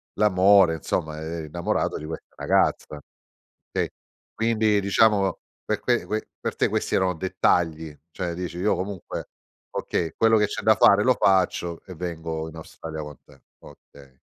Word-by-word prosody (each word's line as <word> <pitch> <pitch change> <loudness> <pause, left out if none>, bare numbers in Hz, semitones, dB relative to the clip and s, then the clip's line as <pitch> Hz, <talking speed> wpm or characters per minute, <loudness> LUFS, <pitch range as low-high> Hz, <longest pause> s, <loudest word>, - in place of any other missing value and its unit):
l'amore, 95 -3 +5
insomma, 75 0 -3
eri 80 0 -5
innamorato 85 +3 -1
di 75 - -7
questa 80 - -8
ragazza. 75 -1 0 0.7
Okay, - - -1 0.4
quindi 110 -2 +2
diciamo 100 -1 +3 0.3
per - - -1
que - - +1
que 110 0 -3
per - - -3
te - - +2
questi - - -1
erano 95 -1 +1
dettagli, 80 -3 0
cioè 85 -1 -4
dici: 90 -1 -5
"Io 100 +4 +2
comunque, 95 0 -5 0.4
okay, 80 -2 -2
quello 115 0 +4
che 105 - +3
c'è - - -5
da 110 - +5
fare 100 +1 +6
lo 130 - +5
faccio 90 -4 +1
e 95 - -9
vengo 80 -2 -4
in 80 - -14
Australia 80 0 -8
con 75 -1 -9
te." - - -20 0.2
okay. 70 -2 -17
90 Hz, 155 wpm, -24 LUFS, 80-100 Hz, 0.7 s, fare